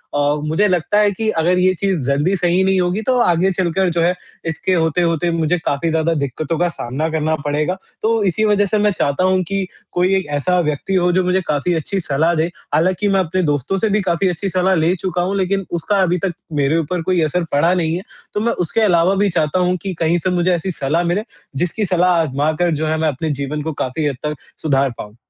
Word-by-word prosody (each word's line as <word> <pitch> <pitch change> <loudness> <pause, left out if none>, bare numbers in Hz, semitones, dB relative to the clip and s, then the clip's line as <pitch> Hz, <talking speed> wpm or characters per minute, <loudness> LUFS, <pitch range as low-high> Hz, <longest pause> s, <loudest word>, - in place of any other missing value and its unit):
अ, - - +1 0.3
मुझे 180 +7 +2
लगता 180 +2 +1
है 205 -1 +4
कि 215 +3 -2
अगर 175 0 +1
ये 185 +1 +3
चीज़ 195 -4 0
जल्दी 145 +8 +1
सही 180 0 +2
नहीं 190 0 +2
होगी 180 +4 0
तो 255 -1 +2
आगे 180 -3 +3
चलकर 185 0 0
जो 170 0 0
है 175 +2 +3 0.4
इसके 160 +4 -1
होते-होते 165 0 +1
मुझे 165 +1 +1
काफ़ी 145 +4 0
ज़्यादा 160 +1 +1
दिक्कतों 150 +2 -2
का 175 - +3
सामना 150 0 -3
करना 160 0 0
पड़ेगा। 150 +5 0 0.2
तो 225 -1 +1
इसी 200 +3 +1
वज़ह 205 -1 +3
से 210 +2 0
मैं 210 0 +3
चाहता 165 -2 0
हूँ 185 0 +3
कि 195 0 -1 0.3
कोई 180 +2 +1
एक 190 - 0
ऐसा 180 +4 +1
व्यक्ति 150 +3 -1
हो 180 -1 +3
जो 185 +1 +2
मुझे 180 +1 +1
काफ़ी 150 +4 0
अच्छी 175 +5 -2
सलाह 160 +1 +1
दे। 160 0 +1 0.3
हालाँकि 185 +5 +2
मैं 195 -1 +3
अपने 185 0 0
दोस्तों 145 +5 0
से 220 +3 0
भी 210 +1 +1
काफ़ी 185 0 0
अच्छी 185 +3 -3
सलाह 185 +1 +2
ले 165 +2 +2
चूका 180 0 -2
हूँ। 190 +3 -1
लेकिन 195 +1 0
उसका 175 +4 0
अभी 180 -1 +2
तक 185 - -1 0.3
मेरे 140 +4 +2
ऊपर 165 +2 -1
कोई 180 +1 +1
असर 170 +3 0
पड़ा 165 +5 +3
नहीं 165 -3 0
है, 180 - -3 0.3
तो - - -1
मैं 235 +2 +1
उसके 225 +7 -1
अलावा 180 -2 +3
भी 200 +1 +2
चाहता 165 0 0
हूँ 180 0 +2
कि 195 -2 -4
कहीं 165 +1 +2
से 185 - -1
मुझे 180 0 +1
ऐसी 185 +3 -3
सलाह 155 +2 -1
मिले 175 +5 0 0.4
जिसकी 205 +5 -1
सलाह 180 0 +2
आज़मा 145 0 0
कर 175 - +3
जो 155 +1 -2
है 160 - 0
मैं 160 - +1
अपने 155 +2 -2
जीवन 150 +2 -3
को 160 0 -3
काफ़ी 140 +4 -2
हद 140 - -2
तक 150 0 -2 0.3
सुधार 140 -3 +2
पाऊँ? 105 0 -9
175 Hz, 230 wpm, -18 LUFS, 160-190 Hz, 0.4 s, है